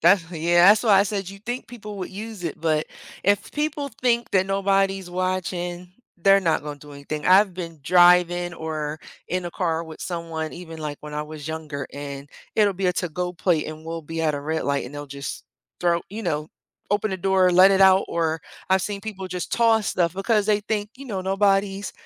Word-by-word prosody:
That's 170 -1 +4
yeah, 175 +2 +4
that's 215 +3 +6
why 205 -4 +5
I - - +6
said 200 -2 -3
you'd 195 +1 -12
think 245 +1 -4
people 215 -4 -8
would 185 - -5
use 210 0 -7
it, 165 - -4
but 155 -1 +1 0.4
if 200 +1 +1
people 295 -1 -2
think 240 -1 +2
that 190 -1 +3
nobody's 195 -1 +1
watching, 180 -1 -3 0.3
they're 195 +3 +5
not 165 -5 +1
gonna 145 -1 -6
do 145 +1 -13
anything. 145 +2 -6
I've 190 0 +5
been 165 -3 -6
driving 175 0 +5
or 155 -2 -4 0.3
in 185 0 -2
a 175 - -4
car 165 -2 -1
with 160 -1 -11
someone 165 -3 -4
even, 165 -2 -9
like, 150 -2 -4
when 150 0 -8
I 150 - -2
was 150 -1 -9
younger, 155 -3 -5
and 140 0 -7 0.3
it'll 210 -2 +4
be 190 +1 -1
a 180 - +3
to-go 180 +1 -3
plate 170 -3 +1
and 155 0 -9
we'll 165 0 -5
be 165 +2 -5
at 155 -2 +1
a 140 - -3
red 160 +2 -2
light 140 0 0
and 125 - -9
they'll 145 0 -6
just 140 0 -6 0.4
throw 175 -1 +2
you 220 +3 -6
know, 155 -2 -1 0.4
open 205 +1 +1
the - - -1
door, 185 0 +3
let 185 +2 +7
it 195 - +3
out, 190 0 +6
or 160 -1 0 0.3
I've 190 0 +3
seen 200 0 -3
people 195 -3 -6
just 180 -1 -5
toss 225 -3 +3
stuff 175 -2 +1
because 205 +2 +1
they 210 -1 +3
think, 210 0 -2
you 275 - -10
know, 195 -5 -3
"Nobody's 195 +1 +1
180 Hz, 210 wpm, -24 LUFS, 160-195 Hz, 0.4 s, let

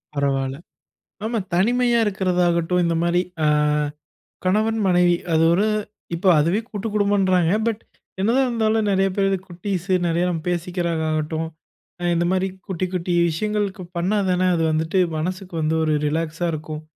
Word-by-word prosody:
பரவால்ல, 135 -1 0 0.7
ஆமா 230 0 -1
தனிமையா 240 +5 +3
இருக்கிறதாகட்டும், 180 -3 +1
இந்த 165 0 +1
மாரி 175 +1 +2 0.2
அ - - +4 1.0
கணவன் 215 +4 +1
மனைவி 175 -1 +4 0.2
அது 160 0 +4
ஒரு 200 +5 +2 0.5
இப்போ 185 +3 0
அதுவே 170 +8 +2
கூட்டுக்குடும்பன்றாங்க. 200 -4 +1
பட் 225 -1 -1 0.4
என்னதான் 250 +6 +3
இருந்தாலும் 220 -2 +1
நிறைய 195 0 +2
பேர் 195 -1 +1
வந்து 195 -1 +1
குட்டீஸு 185 +1 -2
நிறைய 170 +1 +1
நம்ம 165 -3 -2
பேசிக்கிறாங்க 175 -1 -1
ஆகட்டும், 155 +1 -1 0.7
இந்த 170 +1 +1
மாரி 190 +1 +1 0.2
குட்டி 185 0 -2
குட்டி 175 0 -1 0.2
விஷயங்களுக்கு 205 +2 -2
பண்ணா 190 +5 +1
தான, 180 0 +1
அது 165 - 0
வந்துட்டு 160 +4 0 0.2
மனசுக்கு 185 +2 -4
வந்து 155 +1 +1
ஒரு 155 -1 +1
ரிலாக்ஸா 165 +2 -1
இருக்கும். 155 0 -6
180 Hz, 140 wpm, -22 LUFS, 165-205 Hz, 1.0 s, அ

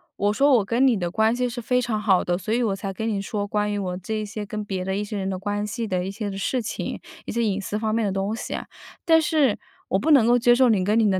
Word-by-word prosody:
我 205 +1 +1
说： 280 +7 +3
“我 200 - 0
跟 240 +5 +2
你 245 -4 +4
的 175 -2 -2
关 220 +4 +2
系 250 0 0
是 240 0 -5
非 250 +2 +1
常 220 -3 -2
好 195 -4 +3
的， 175 - 0
所 205 +3 -5
以 240 +1 +2
我 200 -4 0
才 195 0 -5
跟 220 +4 -4
你 200 -3 -1
说 205 0 -3
关 210 0 0
于 205 - -1
我 180 -2 -3
这 215 +4 -4
一 - - -4
些 210 0 -6
跟 210 +1 -5
别 190 -2 -3
的 190 +1 -2
一 205 - -1
些 210 +1 -6
人 190 0 -2
的 190 - -2
关 205 +2 -2
系 225 +2 -4
的 180 -2 -1
一 190 - -4
些 210 +1 -4
的 195 - -6
事 250 +6 -1
情， 220 - -4 0.3
一 - - -5
些 235 +1 0
隐 205 -2 0
私 205 +2 -3
方 215 0 -1
面 230 0 +1
的 200 - 0
东 195 +3 -1
西。 - - -4 0.5
但 325 -1 +5
是 300 -8 +2 0.3
我 190 - +2
不 315 - -1
能 270 -7 +6
够 240 +1 +5
接 240 +1 +5
受 255 -1 +4
你 200 -4 +3
跟 210 +4 +2
你 215 -2 +4
的 185 - +1
210 Hz, 330 characters per minute, -24 LUFS, 195-235 Hz, 0.5 s, 能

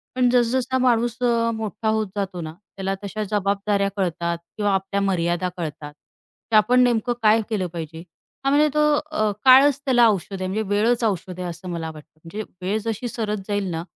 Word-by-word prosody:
पण 250 -1 +3
जस-जसा 250 +1 +1
माणूस 240 -2 +2
अ, 230 -1 +2
मोठा 220 0 -4
होत 220 -1 0
जातो 190 -3 -3
ना, 155 -1 -6 0.2
त्याला 195 0 -2
तशा 215 +2 -4
जबाबदाऱ्या 200 0 0
कळतात 170 -2 -1 0.2
किंवा 205 -1 +1
आपल्या 195 +1 -1
मर्यादा 180 -2 0
कळतात. 150 -3 -6 0.6
ते - - +3
आपण 215 +4 +5
नेमकं 240 0 +1
काय 220 +1 +5
केलं 200 -5 -1
पाहिजे? 160 0 -7 0.4
हां 275 - +3
म्हणजे 300 +1 +5
तो 300 - +1 0.3
अ, 215 -8 +1
काळच 270 +2 +7
त्याला 245 -3 +5
औषध 195 -1 -2
आहे, 185 - -1
म्हणजे 210 +4 -1
वेळच 230 +4 +2
औषध 185 -4 -2
आहे 180 - -3
असं 175 +2 -8
मला 165 -2 -4
वाटतं. 155 0 -16
म्हणजे 205 +6 -6 0.2
वेळ 195 +4 0
जशी 225 +2 -3
सरत 215 -3 -3
जाईल 205 -2 -1
ना, 165 0 -3
205 Hz, 185 wpm, -23 LUFS, 180-230 Hz, 0.6 s, काळच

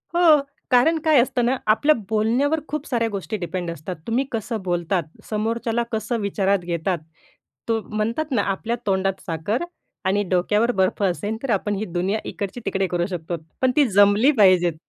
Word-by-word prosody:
हो, 325 -4 +6 0.3
कारण 315 +7 +4
काय 305 -5 +6
असतं 250 -1 0
ना? 260 +2 +2
आपल्या 255 +8 +4
बोलण्यावर 240 +8 +1
खूप 300 0 -4
साऱ्या 230 -3 0
गोष्टी 205 +2 -4
डिपेंड 175 -1 -4
असतात. 170 +3 -6
तुम्ही 245 +4 +1
कसं 225 -1 -3
बोलतात? 175 0 0 0.3
समोरच्याला 225 +2 -1
कसं 220 +1 -2
विचारात 200 -1 +1
घेतात? 170 +1 -1 0.7
तो 225 -1 +1
म्हणतात 230 +8 -1
ना, 230 - +2
आपल्या 200 +4 -2
तोंडात 195 -1 0
साखर 185 - -2 0.4
आणि 200 +2 +2
डोक्यावर 210 +6 +2
बर्फ 190 -1 0
असेन, 205 +3 -1
तर 270 - -3
आपण 205 0 0
ही 210 +2 -3
दुनिया 185 +5 -1
इकडची-तिकडे 195 -2 -3
करू 175 -1 -1
शकतो. 175 -1 -4 0.3
पण 260 -1 +4
ती 290 -4 +5
जमली 205 +7 +5
पाहिजेत. 180 -4 +5
210 Hz, 160 wpm, -22 LUFS, 190-240 Hz, 0.7 s, हो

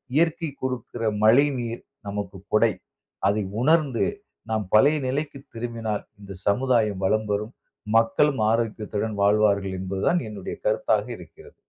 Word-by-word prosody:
இயற்கை 165 0 +2
கொடுக்கிற 125 -2 -4 0.2
மழைநீர் 120 0 +3 0.3
நமக்கு 100 -2 -5
கொடை. 110 0 +4 0.6
அதை 105 +1 +1 0.2
உணர்ந்து 150 -4 +3 0.4
நாம் 110 -1 0
பழைய 145 +8 +6
நிலைக்கு 140 +2 -2 0.2
திரும்பினால் 115 -2 -3 0.2
இந்த 100 -1 -9
சமுதாயம் 110 -3 +2
வளம் 110 +2 +1
பெரும். 105 +4 -2 0.4
மக்களும் 130 +3 +3
ஆரோக்கியத்துடன் 110 -2 -2
வாழ்வார்கள். 100 -2 +3
என்பது 95 +1 -3
தான் 175 - +2
என்னுடைய 100 -3 -6
கருத்தாக - - +2
இருக்கிறது. 445 +2 -15
115 Hz, 120 wpm, -25 LUFS, 105-140 Hz, 0.6 s, பழைய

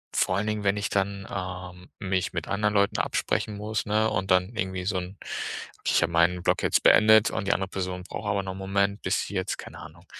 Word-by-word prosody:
vor - - +2
allen 105 - 0
Dingen, 105 -1 -2
wenn 100 +1 +2
ich 100 - -2
dann, 100 0 -1
ähm, 90 -1 -6
mich 95 -1 -1
mit 85 -2 -3
anderen 105 +1 0
Leuten 100 0 +2
absprechen 105 -1 -1
muss, 105 0 -3
ne, 110 +1 +2
und 95 -3 -2
dann 95 +5 +2
irgendwie 95 -1 -3
so 95 -1 0
'n 90 +2 -8 0.7
ich - - +3
habe 85 - -1
meinen 85 +1 +2
Block - - +2
jetzt - - +2
beendet 110 0 +6
und 100 - -3
die - - +3
andere 95 -1 -2
Person 90 -1 -4
braucht 105 +3 -5
aber 100 -1 0
noch 95 - -4
'n - - -9
Moment, 100 +1 0
bis 95 +2 0
sie - - -8
jetzt, 95 +1 -2
keine - - -10
Ahnung, - - -12
95 Hz, 230 wpm, -26 LUFS, 90-105 Hz, 0.7 s, beendet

